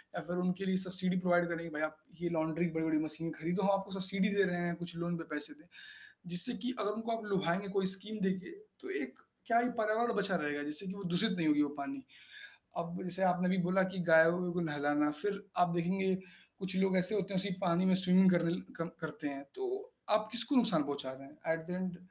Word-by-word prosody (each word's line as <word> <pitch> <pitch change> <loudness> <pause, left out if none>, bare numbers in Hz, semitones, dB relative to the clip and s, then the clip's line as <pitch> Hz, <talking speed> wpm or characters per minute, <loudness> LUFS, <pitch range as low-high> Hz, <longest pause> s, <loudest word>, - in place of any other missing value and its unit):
या - - -3
फिर 175 +2 -5
उनके 180 +2 -2
लिए 190 -1 +1
सब्सिडी 185 0 +2
प्रोवाइड 175 -1 +2
करें 170 -1 -3
कि 170 - -7
भई 150 - -3
आप 155 0 -3 0.2
ये 175 - -1
लॉन्ड्री 160 +1 -1
बड़ी-बड़ी 160 -1 0
मशीनें 155 +1 -1
खरीदो 175 +5 -2
हम 195 - +2
आपको 195 0 -10
सब्सिडी 190 +1 +2
दे 200 - +4
रहे 175 - -2
हैं 170 0 -2
कुछ 170 0 -5
लोन 170 0 -3
पे 165 - -6
पैसे 150 0 -2
दें। - - -24 0.7
जिससे 175 +8 +3
कि 255 +2 -2
अगर 205 0 0
उनको 225 +2 -5
आप 225 - -9
लुभाएँगे 190 +1 0
कोई 195 -1 +1
स्कीम 215 +2 -8
देके 190 - -3 0.3
तो 370 - -9
एक - - -8 0.3
क्या 230 0 +3
ही 240 +1 +1
पर्यावरण 225 +2 +1
बचा 200 -2 +5
रहेगा, 145 -3 -2
जिससे 150 +5 0
कि 185 - -5
वो 200 0 -9
दूषित 215 +5 +3
नहीं 165 -2 0
होगी 150 -1 +3
वो 145 - +1
पानी। 140 -1 -6 0.7
अब 170 +1 -4
जैसे 185 +1 0
आपने 180 0 +2
भी 190 - +1
बोला 190 +1 +3
कि 190 - -5
गायों 165 +2 +5
को 180 - -1
नहलाना 145 -1 0
फिर 200 -1 -2 0.2
आप 175 - 0
देखेंगे 190 +2 0 0.4
कुछ 190 -1 0
लोग 190 0 +2
ऐसे 185 +4 +5
होते 200 -1 -2
हैं 185 - +2
उसी 200 +2 +2
पानी 175 -1 +1
में 185 - +3
स्विमिंग 185 +1 +6
करने 170 -1 +2
ल 175 - -3 0.2
कर 165 - -3 0.2
करते 155 -1 -5
हैं। 140 -1 -6
तो 390 0 -4 0.5
आप 215 0 +2
किसको 240 +4 +5
नुकसान 225 - +4
पहुँचा 140 -1 -3
रहे 135 +1 -12
हैं? 150 - -18 0.2
At 160 0 -6
the - - -6
end 180 0 -4
180 Hz, 235 wpm, -33 LUFS, 160-195 Hz, 0.7 s, स्विमिंग